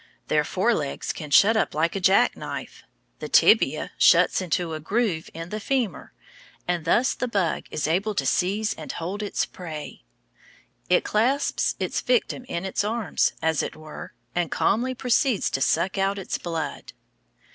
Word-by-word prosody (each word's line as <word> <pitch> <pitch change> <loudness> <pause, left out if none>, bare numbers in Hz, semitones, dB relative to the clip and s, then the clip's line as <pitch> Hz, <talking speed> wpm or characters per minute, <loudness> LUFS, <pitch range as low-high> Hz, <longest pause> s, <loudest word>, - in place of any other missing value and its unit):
Their 150 -1 +3
fore 190 +9 +1
legs 145 -8 -3
can 155 -2 -8
shut 205 +10 +6
up 220 - 0
like 165 +4 +1
a - - -1
jackknife. 195 +6 +1 0.4
The - - -6
tibia - - +4
shuts - - +5
into 175 -1 -1
a 155 - -4
groove 185 0 -1
in 165 +1 -7
the 215 - -4
femur, 235 - -2 0.6
and 175 -2 -1
thus 240 +9 +3
the 250 - -3
bug 195 -8 -1
is 150 - -2
able 195 +6 0
to 140 - 0
seize 200 +9 +1
and - - -7
hold 185 +5 -4
its 205 - -1
prey. 160 - -8 0.9
It 180 - +4
clasps 250 +7 +1
its - - -2
victim 460 - 0
in 170 -6 -4
its 190 - -1
arms, 215 -3 0
as 160 -1 +2
it - - -5
were, 155 -1 -10 0.2
and 175 -2 0
calmly 255 +4 +1
proceeds 250 -2 +1
to 135 - -2
suck 185 +7 +1
out 195 +1 +1
its 195 - -4
blood. 160 -4 -5
190 Hz, 165 wpm, -25 LUFS, 160-220 Hz, 0.9 s, shut